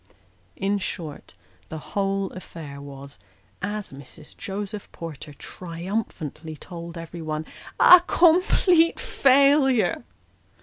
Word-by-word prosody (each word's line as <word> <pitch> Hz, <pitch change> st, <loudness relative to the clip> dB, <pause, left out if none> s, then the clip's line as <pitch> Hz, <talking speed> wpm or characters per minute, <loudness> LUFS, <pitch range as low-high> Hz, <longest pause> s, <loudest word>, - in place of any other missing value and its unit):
In 200 Hz, +1 st, 0 dB
short, 155 Hz, -, -6 dB, 0.3 s
the 160 Hz, -, -5 dB, 0.2 s
whole 195 Hz, -1 st, 0 dB
affair 155 Hz, -6 st, -9 dB
was, 140 Hz, 0 st, -10 dB, 0.4 s
as 205 Hz, -3 st, -3 dB
Mrs. 140 Hz, +2 st, -10 dB
Joseph 205 Hz, +1 st, -6 dB
Porter 155 Hz, -2 st, -8 dB
triumphantly 165 Hz, -1 st, -5 dB
told 170 Hz, +1 st, -8 dB
everybody, 160 Hz, -2 st, -5 dB, 0.3 s
"a 360 Hz, -1 st, +10 dB
complete 345 Hz, 0 st, +4 dB
failure." 275 Hz, -2 st, +3 dB
185 Hz, 90 wpm, -24 LUFS, 155-215 Hz, 0.4 s, a